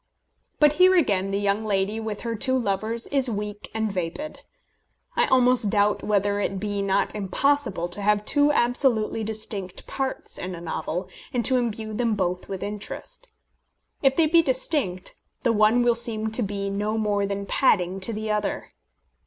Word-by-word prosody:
But 295 -1 +5
here 370 0 +7
again 200 - +2
the 195 - -1
young 200 +1 0
lady 205 +1 0
with 220 -2 -5
her 230 -1 -3
two 260 +4 +2
lovers 220 +1 -1
is 270 -3 +1
weak 210 -1 -5
and 220 -1 -1
vapid. 185 - -4 0.8
I - - +3
almost 250 -3 +4
doubt 205 0 +2
whether 205 -1 +1
it 195 -1 -2
be 205 0 -2
not 195 0 +1
impossible 210 -2 0
to 180 +4 -7
have 210 +1 +2
two 290 +3 +3
absolutely 240 -4 +1
distinct 210 -4 -4
parts 270 -1 -4
in 180 0 -5
a - - -8
novel, 175 +1 -4 0.2
and 245 -2 0
to 260 - +4
imbue 220 -2 -2
them 230 0 0
both 180 -2 -2
with 190 -1 -4
interest. 355 - -7 0.7
If 270 -1 +3
they 330 - +4
be 330 +2 +5
distinct, 260 - -1 0.2
the 235 - +3
one 215 +3 +4
will 240 0 +4
seem 220 -2 -1
to 220 - +2
be 200 -1 -2
no 210 +2 -1
more 205 -2 0
than 200 0 -3
padding 190 -5 +2
to 190 +4 -2
the 215 0 -3
other. 210 -1 -2
215 Hz, 170 wpm, -25 LUFS, 200-245 Hz, 0.8 s, here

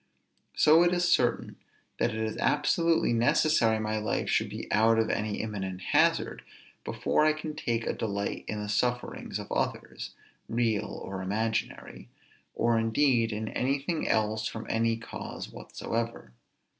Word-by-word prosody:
So 155 +2 +6
it 175 0 +4
is 175 0 +1
certain 120 -7 +1 0.4
that - - +2
it 110 - -5
is 110 -1 -2
absolutely 165 0 +2
necessary 115 -1 +3
my 110 0 -1
life 105 - -1
should - - +1
be - - -6
out 110 +1 +4
of 110 -1 +2
any 105 -1 -2
imminent 95 -4 -4
hazard, - - +2 0.4
before - - +1
I 155 0 +4
can 155 0 -6
take 115 -6 -1
a - - 0
delight 100 -2 -3
in 105 - -3
the - - -5
sufferings 120 +4 -1
of - - -8
others, - - -3 0.3
real 115 -2 +1
or 95 -1 -6
imaginary, 110 +4 -3 0.5
or 115 -1 +2
indeed 115 0 +2
in 110 +1 -3
anything 140 +5 -1
else 110 0 +1
from 110 - -6
any 115 0 +1
cause 115 - -7
whatsoever. 115 - -5
115 Hz, 145 wpm, -29 LUFS, 110-125 Hz, 0.5 s, So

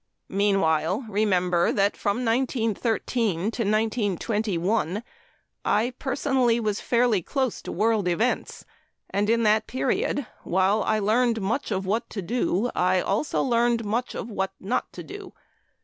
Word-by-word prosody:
Meanwhile, 195 - +1
remember 185 -4 +2
that 200 0 +1
from 215 +5 -1
1913 230 -3 0
to 170 - -4 0.2
1921, 210 -2 0 0.6
I 225 +5 +1
personally 260 -3 +1
was 215 -2 -1
fairly 235 -5 +2
close 260 - -2
to - - -6
world 215 0 +1
events, 220 +8 -1 0.5
and 205 +2 0
in 230 0 +3
that 215 0 +3
period, 260 +1 -1 0.2
while 190 +4 +2
I 215 - +1
learned 225 +3 +2
much 220 +8 -1
of 195 -2 -2
what 215 +4 -1
to 200 - -5
do, 235 +1 0
I 185 +1 +2
also 205 +11 0
learned 235 -2 +2
much 230 +4 -2
of - - -4
what 195 -1 -2
not 245 +7 -2
to - - -7
do. 395 -2 -9
215 Hz, 135 wpm, -25 LUFS, 195-240 Hz, 0.6 s, in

